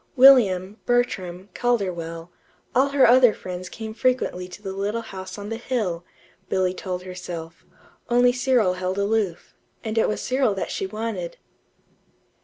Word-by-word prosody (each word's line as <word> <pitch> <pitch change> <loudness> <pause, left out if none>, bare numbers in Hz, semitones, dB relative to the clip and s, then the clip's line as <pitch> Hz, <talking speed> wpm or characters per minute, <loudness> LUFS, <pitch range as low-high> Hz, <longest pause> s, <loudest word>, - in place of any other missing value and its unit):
William, 215 -7 +6
Bertram, 195 -6 0
Calderwell 175 -8 -2 0.4
all 265 +3 +3
her 275 -1 +5
other 245 -1 +6
friends 180 0 -7
came 220 -1 -7
frequently 230 -7 0
to 180 - -11
the 195 -2 -6
little 205 +4 -2
house 190 -3 -8
on 205 0 -6
the 225 - -3
hill, 215 -9 -2 0.5
Billy 185 -1 +1
told 180 -1 -5
herself; 175 -3 -7 0.5
only 245 +1 +5
Cyril 250 -7 +2
held 185 +1 -3
aloof 200 -4 -1 0.3
and 220 0 -1
it - - +3
was 210 - -2
Cyril 255 -5 +1
that 190 - -3
she 195 - -2
wanted. 210 -4 -4
200 Hz, 145 wpm, -24 LUFS, 185-240 Hz, 0.5 s, William